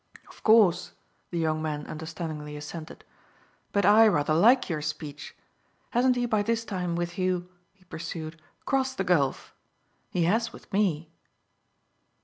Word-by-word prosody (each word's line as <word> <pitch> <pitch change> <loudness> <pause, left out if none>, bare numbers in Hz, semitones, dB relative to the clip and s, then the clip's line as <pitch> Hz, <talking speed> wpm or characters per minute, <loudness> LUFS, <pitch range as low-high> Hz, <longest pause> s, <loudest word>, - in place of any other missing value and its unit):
"Of - - -16
course," 215 -6 +4 0.4
the 175 - -4
young 155 -1 0
man 150 -2 -3
understandingly 155 -2 -6
assented. 155 +2 -8 0.7
"But 200 -2 +2
I 215 +3 +7
rather 150 -6 +2
like 235 +11 +5
your 155 -4 -2
speech. 150 -1 -6 0.6
Hasn't 250 +1 +3
he 245 0 0
by 215 -3 +1
this 230 +2 -1
time, 180 -5 -2
with 175 +1 -3
you," 180 -1 -1 0.2
he 195 -2 -28
pursued, 165 -2 -7 0.2
"crossed 265 -1 0
the 190 - 0
gulf? 150 -8 0 0.6
He 175 - 0
has 225 +7 +1
with - - -15
me." 170 -6 0
175 Hz, 140 wpm, -27 LUFS, 155-210 Hz, 0.7 s, I